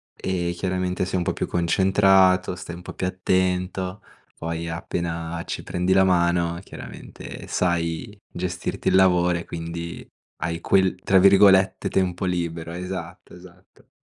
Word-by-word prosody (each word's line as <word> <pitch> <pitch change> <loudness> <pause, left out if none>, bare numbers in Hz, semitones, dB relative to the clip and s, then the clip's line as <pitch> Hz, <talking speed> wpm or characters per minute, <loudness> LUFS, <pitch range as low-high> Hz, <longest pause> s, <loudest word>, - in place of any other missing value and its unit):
ehm, 90 -2 -2
chiaramente 90 0 -2
sei 95 0 -2
un 90 - 0
po' - - -1
più - - -3
concentrato, 95 +1 +3
stai 85 -1 -8
un 90 - -11
po' - - -8
più 90 - -2
attento, 95 +1 -1 0.3
poi 85 0 -4
appena 85 0 -4
ci - - -4
prendi 90 +1 0
la 95 0 +5
mano 85 -2 +2
chiaramente - - -10
sai 85 +4 -1 0.2
gestirti 90 0 -3
il - - +2
lavoro 90 -2 +4
e 85 - -8
quindi 85 0 -6 0.4
hai 85 0 -3
quel, 95 -1 +3
tra 95 - +4
virgolette, 95 0 +5
"tempo 95 -1 0
libero". 85 -2 -3
Esatto, 90 0 -7
esatto. 90 +1 -17
90 Hz, 140 wpm, -23 LUFS, 85-95 Hz, 0.4 s, la